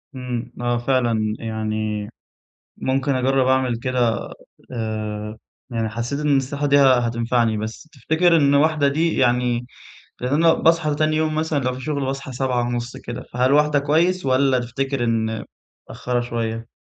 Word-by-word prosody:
امم، 125 -2 -5
آه 120 0 0
فعلًا 120 -4 0
يعني 110 -1 -3 0.7
ممكن 135 +1 0
أجرّب 130 +1 +2
أعمل 130 -2 +2
كده، 125 -2 -1 0.4
آآ، 110 -2 -4 0.3
يعني 115 -2 -1
حسّيت 120 +6 -3
إن 150 - -1
النصيحة 140 +1 +1
دي 145 0 +4
ه 135 -3 +6
هتنفعني. 115 -1 0
بس 110 +8 -6
تفتكر 160 +5 +2
إنّ 140 -3 +3
01:00 150 0 +3
دي 160 +4 0
يعني 120 0 +1 0.6
لأن 125 +2 -1
أنا 165 +2 +5
باصحى 165 -2 +2
تاني 155 +1 +1
يوم 155 0 0
مثلًا 155 -1 0
لو 130 -1 -1
في 130 - -7
شغل 140 0 -2
باصحى 135 0 -4
07:30 120 -1 -2
كده، 120 +1 -7
فهل 125 +2 +2
01:00 150 0 +4
كويّس، 165 +5 +1
والّا 130 0 +3
تفتكر 135 +2 -2
إن 110 -2 -1 0.4
متأخرة 125 -1 -2
شويّة؟ 115 -1 -3
125 Hz, 150 wpm, -21 LUFS, 115-140 Hz, 0.7 s, ه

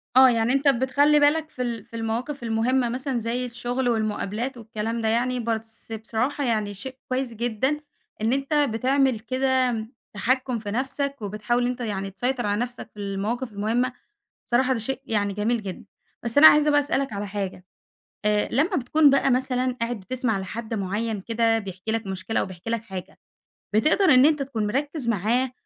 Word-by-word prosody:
آه، 260 0 +9
يعني 230 +1 +2
أنتَ 275 +1 +1
بتخلِّي 280 +3 +4
بالك 310 +2 +3
في 255 - -7
ال 235 -2 -3
في - - -13
المواقف 235 +5 -3
المهمَّة، 235 +2 +1
مثلًا 255 +1 -2
زي 235 +2 -2
الشغل 245 +1 -2
والمقابلات 220 +2 -2
والكلام 225 0 -4
ده 220 - 0
يعني، 245 +3 +1
بس 225 -1 -4
بصراحة 225 +6 -2
يعني 215 -4 0
شيء 260 +7 -8
كويِس 255 -1 -1
جدًا 240 +6 -1 0.4
إن 225 +3 +2
أنتَ 275 +2 -1
بتعمل 265 -2 +2
كده، 255 -2 0 0.3
تحكُّم 255 +4 0
في 210 -2 -5
نفسك، 275 +4 -2
وبتحاول 215 +4 0
أنتَ 250 0 -3
يعني 195 -4 -3
تسيطِر 245 +5 -1
على 205 +2 0
نفسك 245 -1 -5
في 210 - -13
المواقف 205 +5 -3
المهمَّة، 230 +5 0 0.5
بصراحة 255 +2 +2
ده 255 - 0
شيء 265 +5 -2
يعني 205 -4 0
جميل 220 +3 0
جدًا. 190 -3 -7 0.4
بس 235 +4 0
أنا 315 - +10
عايزة 300 -1 +7
بقى 290 - +5
أسألَك 275 -3 -1
على 205 0 -3
حاجة، 195 -2 -4 0.6
آآ، 210 0 +2
لمّا 290 +8 +2
بتكون 290 +4 +4
بقى 275 0 +3
مثلًا 255 0 0
قاعد 230 -1 -1
بتسمع 225 +1 -1
لحد 220 +4 -5
معيَّن 210 +1 -2
كده 225 +1 +1
بيحكي 190 +1 -6
لك 225 -2 -2
مشكلة 190 +3 -2
أو - - 0
بيحكي 185 +3 -8
لك 230 -1 0
حاجة، 190 -4 -8 0.5
بتقدَر 305 - +3
إن 255 +2 +7
أنتَ 300 -2 +2
تكون 235 -6 -2
مركّز 275 +3 -2
معاه، 235 +5 +1
235 Hz, 175 wpm, -25 LUFS, 220-260 Hz, 0.6 s, أنا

